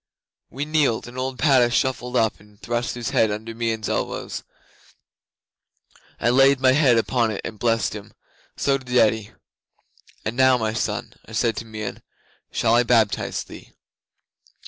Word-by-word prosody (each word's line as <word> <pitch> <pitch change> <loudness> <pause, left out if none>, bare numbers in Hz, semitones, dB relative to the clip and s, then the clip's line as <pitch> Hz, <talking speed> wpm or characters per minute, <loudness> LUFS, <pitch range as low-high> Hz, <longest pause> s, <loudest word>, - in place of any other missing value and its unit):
'We 140 +4 -4
kneeled, 150 -8 +1
and 120 - -11
old 130 0 -3
Padda 130 -5 +4
shuffled 125 -1 -1
up 110 -3 +1
and 105 0 -21
thrust 120 +1 -2
his 120 -1 -4
head 110 - +3
under 110 +2 -5
Meon's 115 -2 -2
elbows. - - -3 1.8
I 120 - +2
laid 135 +1 +5
my 130 -1 +5
hand 130 -4 +4
upon 115 0 +1
it 105 - -4
and 105 - -7
blessed 115 -2 +1
him. 105 -1 -9 0.4
So 140 -1 +1
did 125 -1 -2
Eddi. 110 -2 +2 0.9
'"And 110 - -2
now, 130 0 +5
my 110 -2 -1
son," 115 - -3
I 110 - -12
said 115 0 +1
to - - -5
Meon, 110 -2 -6 0.5
"shall 115 -1 +1
I 120 - +5
baptize 115 -3 +1
thee?" - - -13
120 Hz, 155 wpm, -23 LUFS, 110-130 Hz, 1.8 s, laid